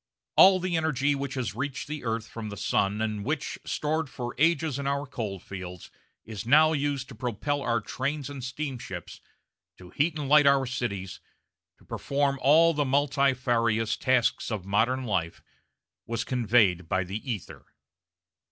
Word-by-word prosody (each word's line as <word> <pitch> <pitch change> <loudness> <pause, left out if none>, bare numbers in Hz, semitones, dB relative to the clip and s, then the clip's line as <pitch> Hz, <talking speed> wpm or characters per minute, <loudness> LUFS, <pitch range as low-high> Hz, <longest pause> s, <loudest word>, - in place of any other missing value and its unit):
All 190 0 +8
the 185 -1 -1
energy 145 -3 +1
which 140 0 -4
has 125 -5 -2
reached 130 +3 -4
the 150 -2 -5
earth 115 -1 -2
from 110 -2 -7
the 100 - -7
sun 100 +2 0
and 105 -2 -2
which, 150 +4 -3
stored 155 0 -1
for 120 -2 -5
ages 155 -3 +2
in 140 - -3
our 140 +1 -1
coal 110 -8 -4
fields, 90 -2 -9 0.3
is 110 -2 -6
now 155 +6 +5
used 140 -3 -1
to - - -9
propel 125 +5 -2
our 115 -3 +1
trains 140 +5 -3
and 140 -3 -7
steamships, 125 - -6 0.6
to 90 -1 -13
heat 155 +2 0
and 145 -2 -3
light 150 0 +6
our 140 -1 +4
cities, 100 -7 -4 0.6
to - - -23
perform 140 -1 -1
all 165 +5 +5
the 150 -1 +1
multifarious 130 -5 +1
tasks 130 -2 +1
of 105 -5 -4
modern 115 +7 +1
life, 95 -8 -2 0.6
was 115 -1 -2
conveyed 110 -9 +2
by 95 -1 +1
the 95 +4 -5
ether. 105 -6 -7
130 Hz, 160 wpm, -27 LUFS, 110-145 Hz, 0.6 s, All